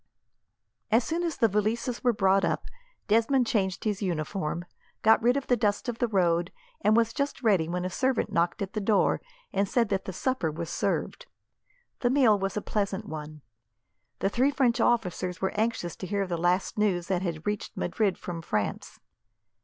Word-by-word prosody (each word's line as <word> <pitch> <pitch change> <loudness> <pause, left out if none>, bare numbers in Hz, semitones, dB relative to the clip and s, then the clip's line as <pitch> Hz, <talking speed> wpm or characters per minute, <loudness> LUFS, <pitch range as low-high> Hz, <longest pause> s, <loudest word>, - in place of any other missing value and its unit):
As 230 +2 +4
soon 330 +6 -2
as 335 -4 -2
the 230 - +4
valises 220 +4 -1
were 245 - +4
brought 195 -2 +3
up, - - 0 0.4
Desmond 230 +4 +3
changed 190 -5 0
his 210 -2 -1
uniform, 170 -1 -2 0.4
got 220 +1 +6
rid 245 +3 +3
of 280 - -3
the 245 - +3
dust 210 -1 0
of 240 -1 -3
the 240 - +2
road, 175 -4 +1 0.3
and 215 +1 +4
was 230 -1 +2
just 280 0 -2
ready 190 -8 +3
when 180 +1 -2
a - - -1
servant 260 +2 0
knocked 170 +5 +1
at 195 - -6
the 215 - -2
door 205 0 +2 0.3
and 195 -1 +1
said 235 -4 +2
that 195 -1 -1
the - - -4
supper 255 -3 -1
was 165 +2 -5
served. - - -2 0.7
The 245 - +2
meal 245 -6 +4
was 195 +1 -2
a 210 - -2
pleasant 200 -2 -2
one. 155 -1 -8 0.8
The 195 - +2
three 255 +6 +2
French 250 -4 +2
officers 185 -6 0
were 190 - 0
anxious 215 -5 -1
to 185 - -6
hear 200 0 0
the 180 -2 -2
last 175 +4 0
news 185 -5 +1
that 180 0 0
had 170 -3 -4
reached 210 0 -3
Madrid 195 +1 0
from 170 -2 -6
France. 105 -10 -3
205 Hz, 185 wpm, -28 LUFS, 180-230 Hz, 0.8 s, got